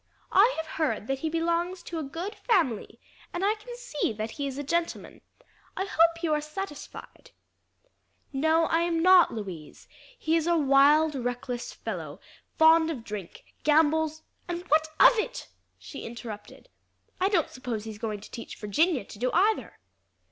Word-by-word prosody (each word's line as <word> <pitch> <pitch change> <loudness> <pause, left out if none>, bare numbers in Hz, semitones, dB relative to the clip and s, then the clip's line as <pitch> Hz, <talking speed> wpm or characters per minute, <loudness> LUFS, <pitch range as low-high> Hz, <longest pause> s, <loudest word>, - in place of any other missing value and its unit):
"I 420 +6 +6
have 320 - -3
heard 310 -9 -2
that 270 +2 -2
he 320 - -2
belongs 340 +2 -1
to 335 - -5
a - - -3
good 335 +9 -5
family, 325 - 0 0.3
and 350 +2 -2
I 415 - +3
can 445 +3 -10
see - - -2
that 215 +1 -4
he 280 +3 -4
is 270 -1 -6
a 285 - -3
gentleman. 335 +4 -2 0.6
I 380 - -1
hope 335 -2 +2
you 315 -2 +2
are 300 - +1
satisfied." 305 +1 -8 1.0
"No, 315 +4 +3
I 330 - +2
am 335 -1 0
not, 370 -1 +7
Louise. 185 -9 -8 0.3
He 320 - 0
is 330 0 +1
a 340 -1 +3
wild, 295 +2 +5
reckless 245 -1 -4
fellow, - - -6 0.4
fond 320 0 +6
of 270 -8 -4
drink, 205 -5 -8 0.2
gambles 315 +1 +2
" - - -41
"And 350 0 -3
what 310 +1 +4
of 470 - +7
it?" - - -4 0.3
she 280 - -9
interrupted. 225 -3 -9 0.5
"I 380 +1 +2
don't 355 -7 +1
suppose 240 -4 -5
he's 220 -2 -8
going 215 -3 -4
to - - -13
teach 230 - -8
Virginia 275 - +1
to 205 - -12
do 250 +1 0
either." 430 +4 +1
315 Hz, 170 wpm, -27 LUFS, 250-340 Hz, 1.0 s, not